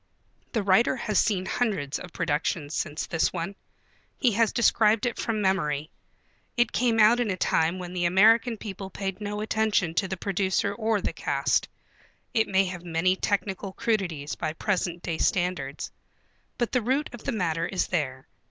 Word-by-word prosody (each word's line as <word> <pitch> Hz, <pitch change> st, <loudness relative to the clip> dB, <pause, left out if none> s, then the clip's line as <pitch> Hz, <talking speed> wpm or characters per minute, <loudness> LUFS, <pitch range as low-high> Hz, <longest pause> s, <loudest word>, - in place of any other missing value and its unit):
The 225 Hz, -4 st, 0 dB
writer 195 Hz, +6 st, +4 dB
has 220 Hz, -4 st, 0 dB
seen 190 Hz, -4 st, +1 dB
hundreds 190 Hz, -, -1 dB
of 180 Hz, -, -9 dB
productions 155 Hz, -2 st, -1 dB
since 155 Hz, -1 st, -2 dB
this 165 Hz, -, +1 dB
one. 180 Hz, +3 st, -4 dB, 0.6 s
He 250 Hz, -, +3 dB
has 225 Hz, +1 st, +2 dB
described 225 Hz, -1 st, +3 dB
it 240 Hz, -, -2 dB
from 215 Hz, -3 st, -1 dB
memory. 155 Hz, -6 st, 0 dB, 0.7 s
It 240 Hz, -1 st, +3 dB
came 235 Hz, -2 st, +2 dB
out 220 Hz, +3 st, +6 dB
in 240 Hz, -3 st, 0 dB
a 185 Hz, -, -1 dB
time 165 Hz, 0 st, +1 dB
when 180 Hz, -1 st, -7 dB
the 175 Hz, -1 st, 0 dB
American 225 Hz, +6 st, +5 dB
people 195 Hz, -2 st, -7 dB
paid 195 Hz, +1 st, -4 dB
no 210 Hz, 0 st, -3 dB
attention 215 Hz, -6 st, +1 dB
to 190 Hz, +3 st, +1 dB
the 190 Hz, 0 st, -4 dB
producer 195 Hz, +1 st, 0 dB
or 220 Hz, -1 st, 0 dB
the -, -, -2 dB
cast. -, -, 0 dB, 0.6 s
It 220 Hz, -1 st, +2 dB
may 195 Hz, 0 st, +3 dB
have 180 Hz, -2 st, -6 dB
many 175 Hz, +2 st, +1 dB
technical 195 Hz, -1 st, -2 dB
crudities 175 Hz, -12 st, -1 dB
by 155 Hz, -2 st, -3 dB
present 175 Hz, -2 st, -2 dB
day 165 Hz, -2 st, -3 dB
standards. 175 Hz, -6 st, -1 dB, 0.7 s
But 240 Hz, -, -1 dB
the 250 Hz, -, +2 dB
root 265 Hz, +6 st, 0 dB
of 240 Hz, -, -9 dB
the -, -, -1 dB
matter 165 Hz, -6 st, -1 dB
is 190 Hz, -, 0 dB
there. 135 Hz, -5 st, -2 dB
190 Hz, 170 wpm, -26 LUFS, 170-220 Hz, 0.7 s, out